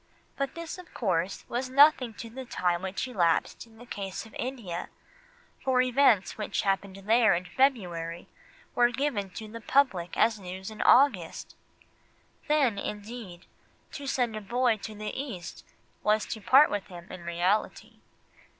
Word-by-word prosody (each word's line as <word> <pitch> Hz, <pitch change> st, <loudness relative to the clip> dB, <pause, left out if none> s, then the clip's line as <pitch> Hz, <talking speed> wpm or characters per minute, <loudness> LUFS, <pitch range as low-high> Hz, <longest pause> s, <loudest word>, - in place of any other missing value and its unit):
But 275 Hz, -1 st, -3 dB
this, 335 Hz, +1 st, -6 dB
of 360 Hz, -, -13 dB
course, 185 Hz, -4 st, -1 dB
was 255 Hz, +2 st, -3 dB
nothing 260 Hz, -4 st, +5 dB
to 230 Hz, -, -8 dB
the 260 Hz, +3 st, -7 dB
time 180 Hz, -7 st, -1 dB
which 190 Hz, +6 st, -3 dB
elapsed 180 Hz, -1 st, 0 dB
in 225 Hz, -1 st, -20 dB
the 240 Hz, -, -12 dB
case 195 Hz, -2 st, -5 dB
of 220 Hz, -, -15 dB
India, 230 Hz, -10 st, -5 dB, 0.7 s
for 260 Hz, -1 st, +2 dB
events 250 Hz, -6 st, +3 dB
which 210 Hz, -, -1 dB
had 200 Hz, -, +1 dB
happened 195 Hz, 0 st, -4 dB
there 225 Hz, -2 st, +5 dB
in 175 Hz, +1 st, -3 dB
February 175 Hz, -9 st, 0 dB, 0.5 s
were 240 Hz, 0 st, +4 dB
given 245 Hz, -6 st, -2 dB
to 220 Hz, -, -6 dB
the 230 Hz, +2 st, -9 dB
public 205 Hz, -10 st, +1 dB
as 220 Hz, -1 st, +3 dB
news 190 Hz, +2 st, -7 dB
in 215 Hz, -, -6 dB
August! 225 Hz, -, +3 dB, 0.9 s
Then, 275 Hz, -9 st, +2 dB
indeed, 210 Hz, -3 st, -7 dB, 0.5 s
to 280 Hz, -1 st, -7 dB
send 245 Hz, -4 st, 0 dB
a 215 Hz, -, -4 dB
boy 235 Hz, +2 st, +1 dB
to 215 Hz, +1 st, -8 dB
the 210 Hz, 0 st, -5 dB
East 235 Hz, -11 st, -6 dB, 0.4 s
was 215 Hz, 0 st, +2 dB
to 220 Hz, -, -9 dB
part 275 Hz, +8 st, +6 dB
with 205 Hz, -2 st, -3 dB
him 175 Hz, -3 st, -10 dB
in 185 Hz, -, -8 dB
reality. 175 Hz, +5 st, -1 dB
220 Hz, 160 wpm, -28 LUFS, 190-255 Hz, 0.9 s, part